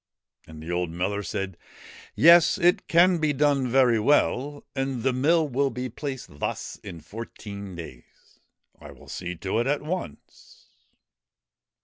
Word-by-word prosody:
And 80 0 -11
the 85 - -6
old 90 -1 -1
miller 95 +5 -2
said: 95 -1 -4 0.3
' - - -18
Yes, 170 0 +6
it 175 -1 +2
can 175 +1 +4
be 155 -2 +1
done 140 -2 +2
very 125 -2 +4
well, 145 +3 +1
and 135 -3 -2
the 130 0 +2
mill 155 +5 +2
will 140 +1 0
be 125 +1 -5
placed 130 - -7
thus - - -4
in 85 -4 -10
fourteen 100 -3 -8
days. 70 -8 -13 0.4
I - - -11
will - - -17
see 90 0 -5
to 95 +6 -2
it 120 - 0
at 145 +1 0
once.' 155 - -7
125 Hz, 150 wpm, -25 LUFS, 95-145 Hz, 0.4 s, Yes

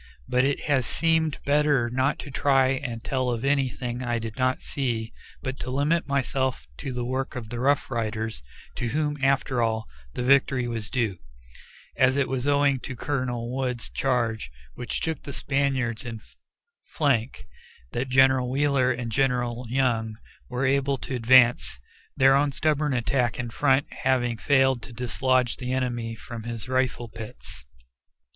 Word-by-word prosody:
But 125 +1 +2
it 140 0 0
has 135 -4 +1
seemed 160 -2 +1
better 145 -4 +3
not 130 +4 0
to 145 - -9
try 135 0 +3
and 120 -3 -3
tell 130 -2 -1
of 120 +1 -2
anything 130 -3 0
I 120 -2 -1
did 115 -1 -5
not 130 -1 +1
see, 115 -5 -2 0.3
but 135 0 -4
to - - -5
limit 145 +6 +1
myself 130 - -1
to 135 - -5
the 125 -1 -3
work 130 +3 -3
of 115 -4 -6
the 120 - -5
Rough 140 +2 +1
Riders, 110 - -3 0.4
to 120 - -1
whom, 150 +3 -1
after 135 -2 +2
all, 110 -1 0 0.3
the 125 - -2
victory 130 -1 +3
was 115 -3 -4
due, 110 -8 -1 0.8
as 130 +1 +3
it 140 - +2
was 130 +1 -2
owing 145 -1 +3
to 130 - -6
Colonel 125 -3 -2
Wood's 125 -3 -2
charge, 120 - 0 0.2
which 125 - -4
took 160 -1 -2
the 140 - -7
Spaniards 135 -5 -1
in 115 -3 -6 0.6
flank, 135 -6 -1 0.5
that 130 +2 -2
General 130 -1 +4
Wheeler 135 -1 +2
and 120 -2 -3
General 125 -1 0
Young 115 -4 0 0.3
were 125 +2 -1
able 140 +1 +2
to 130 - -6
advance, 120 - +4 0.4
their 135 0 +6
own 140 +1 +3
stubborn 150 0 +1
attack 125 0 0
in 120 -2 -4
front 135 +2 +2
having 120 -3 0
failed 135 -1 +3
to 120 - -10
dislodge 125 +1 +1
the 125 -1 -4
enemy 120 -3 -2
from 115 +1 -8
his 115 0 -6
rifle 130 -2 0
pits. 110 - -10
130 Hz, 160 wpm, -26 LUFS, 120-135 Hz, 0.8 s, their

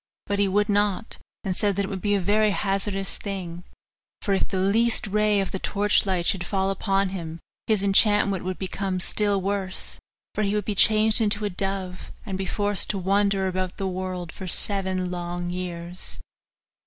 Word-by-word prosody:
But 200 0 -1
he 200 - +3
would 205 +2 +2
not, 205 +1 0 0.2
and 190 -2 -2
said 200 0 +1
that 200 +1 0
it - - -5
would 195 -2 -5
be 205 -1 +2
a - - +2
very 210 +3 +3
hazardous 195 0 -1
thing; 180 -4 -5 0.6
for 200 - +1
if 190 - +1
the 190 - -3
least 220 +5 +2
ray 210 0 +2
of 195 - -1
the 190 - -3
torch 205 +1 +2
light 180 -3 0
should 180 -1 +1
fall 195 +1 0
upon 195 0 +1
him 165 -3 -6 0.3
his 215 -3 +2
enchantment 200 -1 +4
would 185 0 -3
become 190 0 -2
still 205 +2 +3
worse, 195 -1 -3 0.3
for - - -1
he 200 -1 +1
should 210 0 -1
be 210 - -1
changed 215 +2 +4
into 210 -1 +2
a 205 - -1
dove, 190 -1 -4
and 195 -3 -4
be 190 0 -3
forced 205 -1 -1
to 200 - 0
wander 195 +1 +2
about 185 -1 -2
the 195 - -2
world 185 -2 -4
for 190 - -8
seven 185 -1 +1
long 175 0 -4
years. 175 0 -4
195 Hz, 190 wpm, -25 LUFS, 185-205 Hz, 0.6 s, enchantment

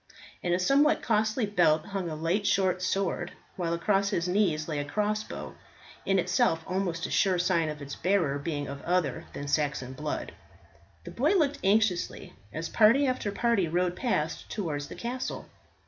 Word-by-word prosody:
In 175 - -1
a 175 - +3
somewhat 275 +11 +3
costly 220 +1 +1
belt 175 -6 +3
hung 195 -3 -3
a 155 - -4
light 170 +6 0
short 190 -3 +2
sword, 185 -2 -1 0.2
while 170 -2 -2
across 195 +4 +1
his 180 -4 -1
knees 180 -5 +1
lay 155 -3 -2
a - - -1
crossbow, 210 +7 -3 0.5
in 195 - +3
itself 180 -2 +2
almost 180 -2 -2
a - - -5
sure 190 -3 +3
sign 175 -3 +1
of 150 -1 -6
its 140 0 -7
bearer 170 -7 +1
being 145 -1 -3
of 140 0 -7
other 180 -3 0
than 145 - -5
Saxon 140 -3 -1
blood. 150 +2 -4 0.7
The - - -8
boy - - +2
looked 300 -6 +2
anxiously 200 -2 +1 0.2
as 165 +2 -4
party 230 +6 +5
after 255 -6 -1
party 230 -4 +1
rode 175 +2 0
past 165 -11 -2
towards 150 -8 -3
the - - -9
castle. 250 +2 -4
180 Hz, 170 wpm, -28 LUFS, 160-210 Hz, 0.7 s, party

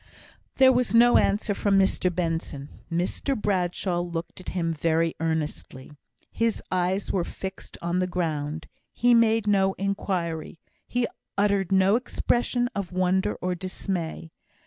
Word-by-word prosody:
There 265 -1 +7
was 245 -1 +1
no 240 +1 +7
answer 205 +1 +1
from 200 0 +2
Mr 190 -1 +2
Benson. 165 -5 -3 0.2
Mr 185 +9 -1
Bradshaw 180 -2 0
looked 175 0 -5
at - - -7
him 165 -2 -1
very 165 +1 +1
earnestly. 155 -4 -3 0.4
His 230 -1 0
eyes 185 +2 0
were 185 - +1
fixed 190 +2 -8
on 170 +1 0
the 185 - +1
ground 160 -3 -2 0.3
he 245 0 +3
made 225 -2 +4
no 195 -2 +3
inquiry 180 -5 -3 0.3
he 245 0 0 0.3
uttered 200 -2 +2
no 190 +2 +4
expression 245 0 0
of 200 -3 -4
wonder 185 +2 +1
or 180 0 0
dismay. 175 -2 -4
185 Hz, 135 wpm, -26 LUFS, 165-205 Hz, 0.4 s, There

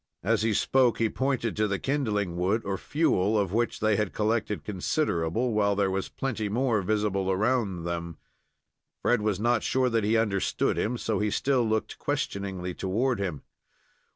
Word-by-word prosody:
As 110 +3 +2
he 110 0 +2
spoke, 130 0 +3
he 115 -1 +1
pointed 130 -4 -1
to 105 0 +1
the 100 -1 -1
kindling 105 -11 -1
wood, 95 +6 0
or 100 0 -1
fuel, 110 - +1
of 100 -3 0
which 115 +1 0
they 110 -1 +3
had 105 -3 -1
collected 110 -1 0
considerable, 105 - -1
while 100 -1 +2
there 100 -1 +1
was 95 0 -2
plenty 115 -6 -3
more 115 -1 +1
visible 100 -1 0
around 100 -2 0
them. 85 -1 -4 0.9
Fred 120 -3 +3
was 105 -3 0
not 120 +1 +2
sure 130 -1 +1
that 115 -2 +1
he 110 +2 +2
understood 105 -4 +1
him, 120 +3 -1
so 110 -4 -1
he 105 - +1
still 130 +3 +1
looked 110 0 -2
questioningly 100 -10 -3
toward 115 +7 0
him. 90 -7 -3
105 Hz, 170 wpm, -27 LUFS, 95-120 Hz, 0.9 s, spoke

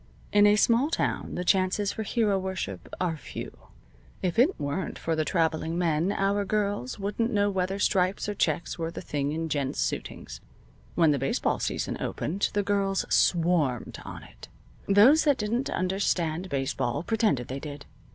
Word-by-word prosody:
In 205 0 +6
a 205 - +5
small 235 +6 +3
town - - -2
the 180 - -2
chances 190 +2 +2
for - - -5
hero 210 -2 +1
worship 185 - -5
are 175 -3 0
few. 155 - -8 0.7
If 180 +3 0
it 300 +10 +3
weren't 145 +7 -3
for 165 - -1
the 155 - +1
traveling 160 0 0
men 170 +1 +1
our 200 +1 +1
girls 200 - -1
wouldn't 210 +4 -1
know 205 -2 +2
whether 190 0 -1
stripes 190 -1 +1
or 210 - -1
checks 170 -3 -1
were 165 0 -2
the 165 - -7
thing 145 -3 -2
in 160 +1 -2
gents' 140 -4 -2
suitings. - - -4 0.5
When 165 -3 +4
the 140 - +1
baseball 135 - 0
season - - -2
opened 190 +6 -1
the 205 - +1
girls 195 -1 0
swarmed 165 -8 +2
on - - -8
it. - - -14 0.4
Those 225 +11 +6
that 290 -3 +4
didn't 235 +5 -1
understand 185 -2 -1
baseball 135 0 -1
pretended 210 - +1
they 135 +2 -4
did. 145 0 -8
185 Hz, 165 wpm, -27 LUFS, 155-205 Hz, 0.7 s, In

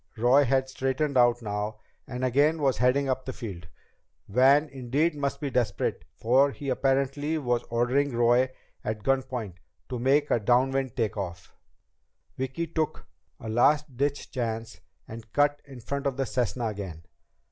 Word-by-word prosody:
Roy 125 +5 +5
had 130 +1 +1
straightened 135 +2 -1
out 120 -1 +4
now, 105 0 -3 0.3
and 125 0 -3
again 145 +6 +3
was 135 -3 +1
heading 130 +3 +3
up 130 0 -1
the 130 - -4
field. 95 -10 -7 0.6
Van 135 +7 +5
must 155 - -15
indeed 145 +5 0 0.2
be 145 -3 -3
desperate, 115 -6 -1
for 130 +5 +3
he 140 0 -6
apparently 135 +4 0
was 120 -5 0
ordering 125 +3 +1
Roy 120 +2 +4 0.3
at 110 -1 -4
gun 135 +2 +2
point 115 -9 -6 0.3
to 125 -2 -3
make 140 +4 +2
a - - +3
downwind 130 +3 +1
take 115 -2 -1
off. 90 -3 -6 0.8
Vicki 130 +6 -3
took 160 -1 -3 0.3
a - - -8
last 140 +5 +2
ditch 140 +2 -2
chance 115 -3 -4 0.3
and 115 -1 -10
cut 145 0 +2
in 135 -3 -11
front 140 +4 -3
of 135 -1 -2
the 135 - 0
Cessna 125 -1 -1
again. 95 -6 -7
130 Hz, 160 wpm, -27 LUFS, 115-140 Hz, 0.8 s, Roy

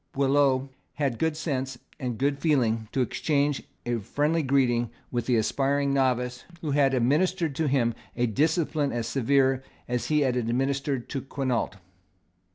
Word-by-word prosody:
Boileau 135 -1 +2 0.3
had 140 -4 0
the - - -10
good 160 -1 0
sense 135 -5 -2 0.2
and 125 -4 -3
good 140 +2 0
feeling 115 -8 +1
to 135 - 0
exchange 145 +2 0 0.2
a 120 -1 0
friendly 150 +10 0
greeting 125 -4 +2 0.2
with 120 -1 -2
the 125 - +3
aspiring 140 +5 +1
novice 125 -2 0 0.2
who 155 - -2
had 135 -1 +3
administered 155 +6 +1
to 155 +2 0
him 125 -4 +2 0.2
a 120 - +1
discipline 150 - +1
as 115 -1 -2
severe 135 +2 +2 0.3
as 125 0 -2
he 150 -1 +2
had 130 -3 +2
administered 135 +2 -1
to 135 - -3
Quinault. 130 -5 -2
135 Hz, 155 wpm, -27 LUFS, 125-145 Hz, 0.3 s, the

